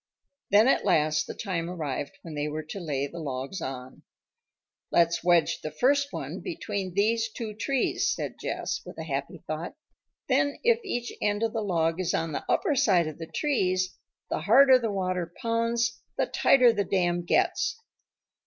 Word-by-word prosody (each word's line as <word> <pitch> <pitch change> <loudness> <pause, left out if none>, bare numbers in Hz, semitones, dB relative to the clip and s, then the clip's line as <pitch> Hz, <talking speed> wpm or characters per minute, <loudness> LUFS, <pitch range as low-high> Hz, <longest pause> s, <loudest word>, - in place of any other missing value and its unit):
Then 210 +4 +6
at - - +3
last 150 0 +2
the - - -6
time 175 -5 -3
arrived 155 +1 -4
when 165 - -8
they 145 0 -2
were 155 +1 -4
to 155 +6 -7
lay 145 -6 -2
the 170 +4 -8
logs 140 +4 -4
on. 130 -2 -7 0.9
"Let's 170 0 +3
wedge 175 -2 +3
the 155 - -4
first 280 - +2
one - - -5
between 200 - -4
these 225 +3 +2
two 220 -2 -5
trees," 275 - 0
said - - -4
Jess, - - -3
with - - -11
a 160 - -4
happy 140 -3 -4
thought. 160 - -5 0.5
"Then 280 +2 +2
if 470 0 +3
each 245 - -3
end 205 +1 0
of 225 0 0
the 225 - -1
log 165 -4 0
is 185 - 0
on 165 0 -1
the - - -3
upper 345 -8 +2
side 185 -9 +4
of 155 +1 -6
the 165 - -6
trees, 185 - 0 0.4
the - - 0
harder 255 - +6
the 225 -3 -2
water 185 -3 -2
pounds 230 0 0 0.2
the - - +2
tighter 250 -3 +5
the 205 -2 0
dam 175 -3 +1
gets." 315 - +1
185 Hz, 175 wpm, -27 LUFS, 160-230 Hz, 0.9 s, Then